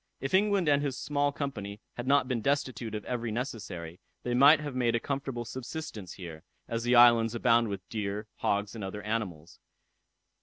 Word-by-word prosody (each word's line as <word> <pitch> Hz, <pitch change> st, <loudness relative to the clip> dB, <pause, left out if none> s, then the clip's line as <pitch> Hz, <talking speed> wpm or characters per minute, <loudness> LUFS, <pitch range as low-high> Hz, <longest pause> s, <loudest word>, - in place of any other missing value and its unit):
If 135 Hz, -, -4 dB
England 200 Hz, -2 st, +3 dB
and 145 Hz, -1 st, +4 dB
his 140 Hz, -3 st, -2 dB
small 145 Hz, +2 st, 0 dB
company 105 Hz, -8 st, -5 dB
had 120 Hz, +1 st, -6 dB
not 140 Hz, -1 st, +4 dB
been 125 Hz, -3 st, -1 dB
destitute 130 Hz, -5 st, -1 dB
of 105 Hz, -, -5 dB
every 120 Hz, -2 st, -2 dB
necessary, 100 Hz, -8 st, -5 dB, 0.2 s
they 120 Hz, -, -1 dB
might 140 Hz, +5 st, +7 dB
have 145 Hz, -3 st, -5 dB
made 120 Hz, -2 st, +1 dB
a -, -, +2 dB
comfortable 135 Hz, -2 st, -3 dB
subsistence 120 Hz, -, -6 dB
here, 85 Hz, -4 st, -9 dB, 0.3 s
as 115 Hz, 0 st, -2 dB
the 120 Hz, +1 st, +2 dB
island 120 Hz, -1 st, +6 dB
abounds 115 Hz, -1 st, +3 dB
with 100 Hz, -, -6 dB
deer, 105 Hz, -1 st, -3 dB
hogs, 100 Hz, +1 st, 0 dB
and 110 Hz, -3 st, -6 dB
other 100 Hz, +2 st, -5 dB
animals. 95 Hz, -8 st, -4 dB
120 Hz, 180 wpm, -29 LUFS, 105-140 Hz, 0.3 s, might